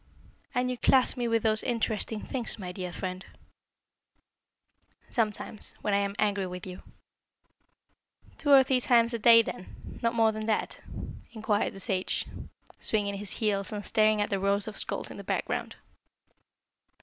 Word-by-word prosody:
"And 250 0 +1
you 250 - -5
class 260 -1 +4
me 245 -2 -1
with 230 -1 +1
those 220 -1 +4
interesting 220 -2 0
things, 245 -4 -3
my 185 -4 -6
dear 180 -1 -5
friend?" 185 +1 -5 1.9
"Sometimes: 215 -2 -1
when 210 - 0
I - - +4
am 200 0 -2
angry 200 -2 +1
with 180 0 -7
you." 185 -1 -8 1.6
"Two 300 - -1
or 275 -2 +8
three 260 -1 +1
times 235 -2 +3
a 235 - -2
day, 230 +1 +8
then? 185 - -9
Not 230 0 0
more 225 -1 +4
than 215 0 -5
that?" 220 - -1 0.5
inquired 215 -2 0
the - - -9
sage, 190 -1 -1 0.5
swinging 200 -2 0
his 205 -1 -5
heels, 200 -3 -1
and 205 -1 -5
staring 215 -1 +3
at 205 - -1
the 195 - +1
rows 200 +1 +2
of 215 - -6
skulls - - -2
in - - -9
the - - -8
background. - - -2
215 Hz, 160 wpm, -28 LUFS, 200-230 Hz, 1.9 s, or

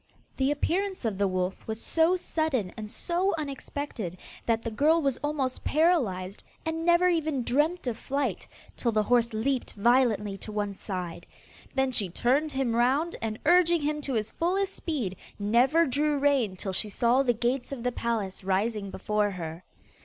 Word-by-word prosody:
The 270 0 +2
appearance 370 +3 -1
of 205 -4 -1
the 200 - +3
wolf 185 0 -2
was 220 0 -3
so 325 +8 +3
sudden 315 - -1
and 215 -1 -7
so 360 - 0
unexpected, 275 - -5 0.3
that 230 -1 +1
the 230 - -3
girl 305 +8 +3
was 275 -5 0
almost 285 -4 -1
paralysed, 230 - +1 0.2
and 320 0 -2
never 345 +1 +5
even 315 -7 +1
dreamt 300 +8 +1
of 235 -3 -2
flight, 280 +2 -2 0.3
till 235 - 0
the 215 -1 +2
horse 235 +1 +3
leaped 245 +4 -1
violently 215 -3 +2
to 215 - -7
one 205 -1 -2
side. 185 -3 -5 0.5
Then 265 -1 +2
she 205 -6 +1
turned 270 - +1
him 265 -4 0
round, 270 +8 +2
and 220 -1 -2
urging 345 0 +5
him 300 0 -1
to 275 -2 -3
his 215 -1 -1
fullest 380 +3 0
speed, 240 - -3 0.2
never 245 +11 +3
drew 295 +2 +1
rein 275 -8 +2
till 190 +1 -4
she 210 +3 0
saw 240 +5 +3
the 250 -3 +2
gates 245 +3 -1
of 260 -4 -5
the 250 - +1
palace 220 -6 -2
rising 200 +2 0
before 210 +2 0
her. 170 -2 -6
250 Hz, 170 wpm, -28 LUFS, 210-300 Hz, 0.5 s, never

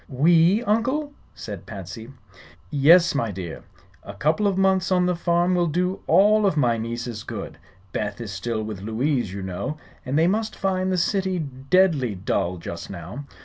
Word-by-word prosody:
"We, 165 - +4
Uncle?" 260 +7 0 0.2
said 100 -5 -8
Patsy. 105 +4 -8 0.6
"Yes, 165 +5 +6
my 115 -5 0
dear. 90 -4 -6 0.4
A - - -10
couple 165 +8 +1
of 195 -2 0
months 190 -1 +2
on 180 -1 +3
the 180 0 +1
farm 175 +1 +1
will 175 -1 +2
do 180 +4 -1
all 205 +5 +5
of 165 - 0
my 120 -5 +2
nieces 115 0 -4
good. - - -7 0.3
Beth 105 0 -3
is 115 -3 -6
still 110 +3 -3
with 105 -3 -6
Louise, 120 +1 -1
you 100 0 -6
know, 95 +11 -4 0.3
and 135 +2 -1
they 160 - +4
must 215 +4 0
find 190 -1 -1
the 185 - +1
city 190 +1 0
deadly 140 - +1
dull, 90 -1 -1
just 85 0 -7
now. 100 - -7
150 Hz, 170 wpm, -24 LUFS, 110-185 Hz, 0.6 s, Yes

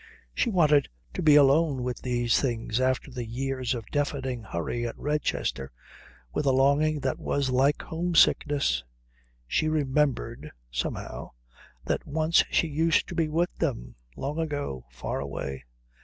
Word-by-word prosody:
She 240 - +1
wanted 150 - +4 0.2
to - - -3
be 150 -2 +6
alone 145 -1 +4
with 125 0 -3
these 120 -2 +1
things 120 -3 -1
after 130 +2 0
the 125 -1 -4
years 130 +2 -2
of 115 -3 -6
deafening 135 -4 -1
hurry 110 +5 -3
at 115 - -7
Redchester 145 - -2 0.6
with 145 - -1
a - - +5
longing 140 +3 +3
that 130 -1 -1
was 140 -2 -1
like 135 +3 +2
home 170 +1 -3
sickness. 140 - +3 0.6
She 155 - +1
remembered, 145 - 0 0.2
somehow, - - -4 0.5
that - - -2
once 160 +2 +3
she - - +2
used 160 +2 +2
to - - -5
be 160 -2 0
with 170 +3 0
them 125 - -2 0.2
long 145 +4 -3
ago, 145 - -3
far 60 +2 -4
away.... 70 -1 -5
135 Hz, 145 wpm, -27 LUFS, 120-150 Hz, 0.6 s, be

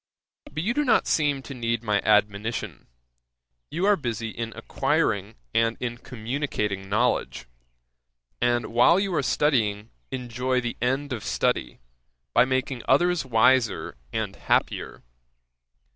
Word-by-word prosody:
'But 155 +3 -3
you 230 +6 +1
do 295 - +1
not 250 -6 +3
seem 145 -3 +1
to 140 - -8
need 115 -2 -2
my 105 -3 +1
admonition. 105 +1 0 0.8
You 180 - -1
are 205 0 +5
busy 115 - -3
in 115 0 -5
acquiring - - 0 0.2
and 115 0 +2
in 120 -1 -4
communicating 110 -6 -3
knowledge, 115 - 0 1.0
and 120 -1 +1
while 120 +9 +5
you 195 -2 -1
are 165 - +2
studying, 115 -7 +1 0.2
enjoy 125 0 -1
the 120 -1 -3
end 135 +3 0
of 110 - -5
study, - - -1 0.5
by 120 - +6
making 130 -1 -1
others 175 +1 +3
wiser 115 - +3 0.2
and - - -3
happier. - - -1
120 Hz, 130 wpm, -25 LUFS, 115-140 Hz, 1.0 s, by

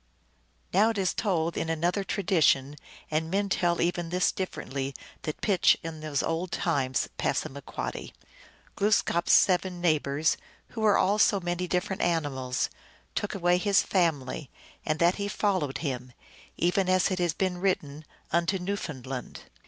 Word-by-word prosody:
Now 205 +5 +5
it 225 - -2
is 190 -2 +1
told 170 -6 0
in 160 - -2
another 170 +5 0
tradition 160 -9 +2 0.4
and 160 +1 0
men 200 +2 0
tell 175 -2 +1
even 175 0 0
this 180 +1 +2
differently 140 -7 -4 0.3
that 155 - -5
pitchS, 195 -5 +4
in 165 -1 -6
these 155 -2 -1
old 165 +2 -2
times 135 -6 0
(P.) - - +2 1.4
Glooskap 195 -4 +2
s - - +5
seven 180 -1 +3
neighbors, 155 -3 +1 0.3
who 225 - -6
were 210 -2 +5
all 205 +2 +2
so 200 -1 +4
many 175 0 -2
different 190 +2 -1
animals, 140 -7 0 0.5
took 205 - -2
away 175 -1 +2
his 200 +1 +3
family, 155 -6 0 0.3
and 155 - 0
that 170 +3 +3
he 200 0 -2
followed 185 -9 0
them, 125 -4 -4 0.4
even 180 +2 +1
as 185 +1 +3
it 185 - -1
has 175 -3 +1
been 185 -2 -1
written, 155 -6 -1 0.3
unto 170 +3 +2
New 195 +3 -2
foundland. 130 -7 -6
175 Hz, 150 wpm, -28 LUFS, 155-190 Hz, 1.4 s, Now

